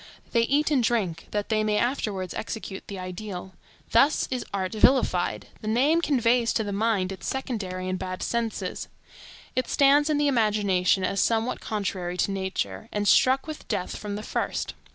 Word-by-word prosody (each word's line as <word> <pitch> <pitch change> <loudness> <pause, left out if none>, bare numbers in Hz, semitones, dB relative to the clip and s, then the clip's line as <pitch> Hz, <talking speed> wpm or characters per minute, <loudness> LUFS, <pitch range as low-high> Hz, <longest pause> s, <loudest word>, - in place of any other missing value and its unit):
They 235 - +3
eat 290 +6 +2
and 275 -4 +4
drink, 195 -8 0
that 205 -1 -2
they 215 -1 +2
may 210 -1 +1
afterwards 210 -7 -1
execute 200 -4 -6
the 200 - -6
ideal. 185 0 -6 0.4
Thus 275 +6 +4
is 255 -2 -1
art 190 -2 -2
vilified; 220 -6 +2
the 215 - -6
name 275 +9 +3
conveys 240 -5 +2
to 220 - +1
the 205 -1 -4
mind 200 -3 +1
its 190 - -7
secondary 195 -9 -3
and 185 0 -2
bad 185 -1 -4
senses; 235 -2 -2 0.7
it 255 0 0
stands 285 +2 +4
in 300 - +2
the 290 0 +2
imagination 205 -7 +2
as 195 +1 0
somewhat 230 +2 +1
contrary 185 -4 -3
to 200 - +1
nature, 190 - -3
and 205 0 -1
struck 260 +6 +4
with 310 -1 -8
death 180 - -2
from 205 -1 -5
the 210 - -5
first. - - -2
215 Hz, 175 wpm, -26 LUFS, 190-245 Hz, 0.7 s, and